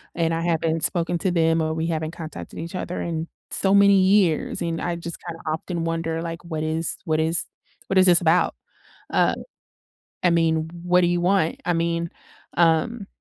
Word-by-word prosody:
and 165 -1 +1
I 165 - -1
haven't 165 -1 0
spoken 175 -1 +1
to 190 - 0
them 165 -1 +2
or 155 0 -1
we 160 0 -1
haven't 160 -1 -2
contacted 165 -2 -8
each 165 +1 -6
other 180 0 -4
in 165 -1 -3 0.2
so 195 0 +2
many 200 -1 +6
years, 190 -4 +2
and 165 -1 -2
I 175 -1 -1
just 170 0 -5
kinda 165 -1 -6
often 165 +2 -3
wonder, 165 0 -2
like, 165 +1 -6
what 160 -2 -3
is 160 +1 -1
what 155 -1 +1
is 160 +2 +1 0.4
what 190 -1 +3
is 185 - +6
this 175 -1 +7
about? 170 +1 +3 0.6
Uh, - - +3 0.9
I 175 - +5
mean, 160 -1 +2
what 180 +1 +3
do 175 - +4
you 175 0 +1
want? 180 -2 +1
I 175 - +1
mean, 170 0 -1 0.5
um 170 +6 +2
165 Hz, 185 wpm, -23 LUFS, 160-175 Hz, 0.9 s, this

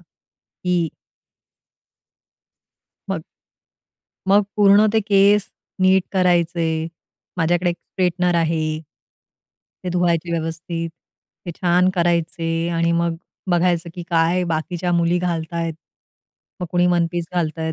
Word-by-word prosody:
की 180 -2 -4 2.2
मग - - -2 1.0
मग 200 +2 +5
पूर्ण 205 +1 +6
ते 220 - +3
केस 200 0 +3 0.3
नीट 190 0 +5
करायचे, 170 -3 +1 0.5
माझ्याकडे 175 +1 +1
एक 170 - -4
स्ट्रेटनर 180 -1 -1
आहे. 160 -1 0 1.0
ते - - -2
धुवायचे 175 -1 +1
व्यवस्थित, 165 +1 -3 0.6
ते - - -3
छान 180 0 +3
करायचे 170 -1 0
आणि 170 0 +2
मग 170 0 0 0.3
बघायचं, 175 -1 +1
की 175 - -6
काय 170 +2 +2
बाकीच्या 175 +2 -2
मुली 170 +1 +2
घालतायेत. 165 -1 -2 0.9
मग 180 - -2
कुणी 175 0 +2
वन-पीस 175 -1 +1
घालतंय, 160 -2 -1
170 Hz, 100 wpm, -21 LUFS, 165-180 Hz, 2.2 s, पूर्ण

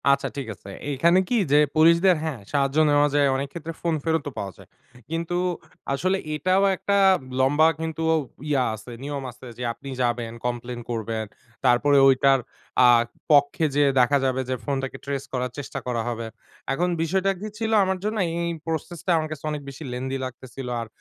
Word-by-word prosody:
আচ্ছা 140 0 +3
ঠিক 135 -4 -4
আছে, 100 - -13 0.2
এইখানে 170 +6 +4
কি 245 - +2
যে 145 - +6 0.2
পুলিশদের, 170 +4 +5
হ্যাঁ 155 -6 -3
সাহায্য 140 0 +1
নেওয়া 145 0 +4
যায় 145 -1 +4
অনেক 135 +1 -2
ক্ষেত্রে 165 -1 -6
ফোন 170 -2 +1
ফেরতও 160 -3 0
পাওয়া 100 -2 -5
যায় - - -16 0.4
কিন্তু 165 +2 -2 0.6
আসলে 185 +7 +1 0.2
এটাও 185 +5 +2
একটা 200 +2 0 0.4
লম্বা 145 +4 +4
কিন্তু 160 0 -3
ঔ - - +4 0.3
ইয়া 140 -3 +2
আছে, 110 +3 -11
নিয়ম 140 -1 -4
আছে 125 +1 -13
যে 125 - -5
আপনি 140 +3 -10
যাবেন, 120 -1 0
কমপ্লেইন 120 0 -3
করবেন 110 -1 -2 0.4
তারপরে 130 +3 +4
ওইটার 135 0 +5 0.5
আ - - +8 0.4
পক্ষে 145 +2 +4
যেয়ে 145 -1 +4
দেখা 125 +3 +4
যাবে 130 0 +1
যে 130 - 0
ফোনটাকে 135 -2 -3
ট্রেস 140 -1 -3
করার 125 -1 -1
চেষ্টা 145 - -5
করা 120 -2 0
হবে। 115 -1 -3 0.5
এখন 175 +6 0
বিষয়টা 190 +4 +1
কি 210 - -5
ছিল 220 0 -2
আমার 190 0 0
জন্য 215 +1 -1 0.2
এই 170 0 -1 0.2
প্রসেসটা 165 +2 -3
আমার 155 -1 -2
কাছে 155 -3 -7
অনেক 150 -1 -4
বেশি 140 +3 -9
lengthy 130 +2 -3
লাগতেছিল 130 +1 -8
আর 115 - -6
140 Hz, 175 wpm, -24 LUFS, 130-165 Hz, 0.6 s, আ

